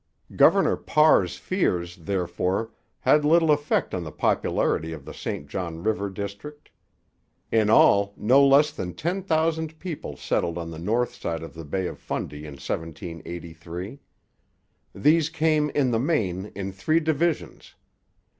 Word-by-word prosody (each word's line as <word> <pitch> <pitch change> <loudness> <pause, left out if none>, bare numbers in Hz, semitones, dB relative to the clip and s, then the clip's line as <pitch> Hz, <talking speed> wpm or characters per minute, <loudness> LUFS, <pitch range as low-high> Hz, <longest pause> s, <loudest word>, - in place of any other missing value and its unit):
Governor - - +5
Parr's 100 - +3
fears, 90 - -1
therefore, 90 +4 -2 0.3
had 150 - +4
little 160 +1 +4
effect 145 0 +1
on 90 - -2
the 75 - -7
popularity 80 +2 0
of - - -10
the - - -8
St 70 - -5
John 85 +1 -5
river 105 -2 0
district. 100 - -8 0.8
In 110 -2 +3
all, 100 -2 +5
no 130 +6 +5
less 140 +2 +5
than 90 -1 -6
ten 180 +5 -2
thousand 160 -2 0
people 155 - -6
settled 85 +5 -1
on 85 -1 -5
the 80 - -8
north 115 +8 0
side 80 -1 -4
of 80 - -9
the 80 -1 -9
Bay 95 +6 -2
of - - -5
Fundy 75 +1 -5
in 75 - -8
1783. 85 - -7 1.0
These 155 +8 +3
came, 155 -2 +1
in 140 -3 +1
the 115 - +1
main, 105 - 0
in 95 0 -4
three 155 +12 +1
divisions. 160 +1 -2
100 Hz, 145 wpm, -25 LUFS, -, 1.0 s, Governor